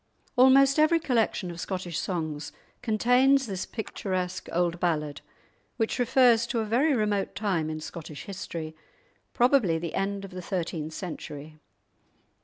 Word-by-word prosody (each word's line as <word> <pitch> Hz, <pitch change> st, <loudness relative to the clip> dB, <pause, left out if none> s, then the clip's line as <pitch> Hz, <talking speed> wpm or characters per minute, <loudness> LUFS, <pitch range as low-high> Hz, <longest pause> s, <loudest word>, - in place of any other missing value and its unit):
'" -, -, -42 dB
Almost 270 Hz, +3 st, +6 dB
every 320 Hz, +2 st, +5 dB
collection 225 Hz, -, 0 dB
of 170 Hz, -, -9 dB
Scottish 180 Hz, -2 st, -3 dB
songs 155 Hz, -5 st, -3 dB, 0.3 s
contains 250 Hz, +5 st, +3 dB
this 190 Hz, -4 st, -4 dB
picturesque 185 Hz, -4 st, -4 dB
old 175 Hz, 0 st, 0 dB
ballad, 150 Hz, -4 st, -1 dB, 0.6 s
which 225 Hz, +2 st, -1 dB
refers 240 Hz, -1 st, +4 dB
to 240 Hz, -, -2 dB
a 225 Hz, -, 0 dB
very 265 Hz, +7 st, +2 dB
remote 210 Hz, -4 st, 0 dB
time 190 Hz, -7 st, -1 dB
in 155 Hz, 0 st, -4 dB
Scottish 155 Hz, -1 st, -8 dB
history, 165 Hz, -5 st, -6 dB, 0.6 s
probably 240 Hz, -9 st, +4 dB
the 165 Hz, 0 st, -5 dB
end 195 Hz, 0 st, -2 dB
of 195 Hz, -, -11 dB
the 185 Hz, 0 st, -6 dB
thirteenth 165 Hz, -4 st, -3 dB
century. 155 Hz, -4 st, -7 dB
195 Hz, 140 wpm, -27 LUFS, 165-240 Hz, 0.6 s, Almost